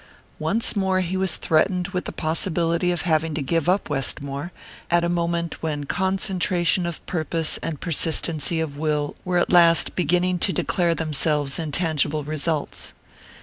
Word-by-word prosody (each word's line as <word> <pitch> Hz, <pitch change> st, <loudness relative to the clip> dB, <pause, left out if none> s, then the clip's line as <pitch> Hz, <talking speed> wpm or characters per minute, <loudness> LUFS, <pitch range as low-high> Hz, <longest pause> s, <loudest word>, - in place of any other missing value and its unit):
Once 205 Hz, +10 st, +3 dB
more 190 Hz, -2 st, +1 dB
he 185 Hz, +1 st, -2 dB
was 190 Hz, -3 st, +1 dB
threatened 180 Hz, +3 st, +1 dB
with 180 Hz, -2 st, -3 dB
the -, -, -3 dB
possibility 170 Hz, +1 st, 0 dB
of 175 Hz, -, -2 dB
having 160 Hz, -2 st, +1 dB
to 155 Hz, -, -2 dB
give 165 Hz, +3 st, 0 dB
up 190 Hz, +2 st, +1 dB
Westmore, 140 Hz, +2 st, -2 dB, 0.4 s
at 175 Hz, 0 st, +3 dB
a -, -, +1 dB
moment 170 Hz, -1 st, -2 dB
when 150 Hz, -3 st, -2 dB
concentration 185 Hz, 0 st, 0 dB
of 170 Hz, -, -7 dB
purpose 165 Hz, -1 st, -1 dB
and 155 Hz, -4 st, -4 dB
persistency 165 Hz, -1 st, -1 dB
of 145 Hz, -3 st, -4 dB
will 150 Hz, -2 st, -1 dB
were 180 Hz, -1 st, 0 dB
at 175 Hz, -, +1 dB
last 170 Hz, -2 st, +6 dB
beginning 180 Hz, +1 st, +1 dB
to 190 Hz, -, +1 dB
declare 170 Hz, -2 st, 0 dB
themselves 150 Hz, -2 st, -1 dB
in 160 Hz, -2 st, -3 dB
tangible 155 Hz, -2 st, +1 dB
results. 155 Hz, 0 st, -2 dB
165 Hz, 155 wpm, -23 LUFS, 155-180 Hz, 0.4 s, last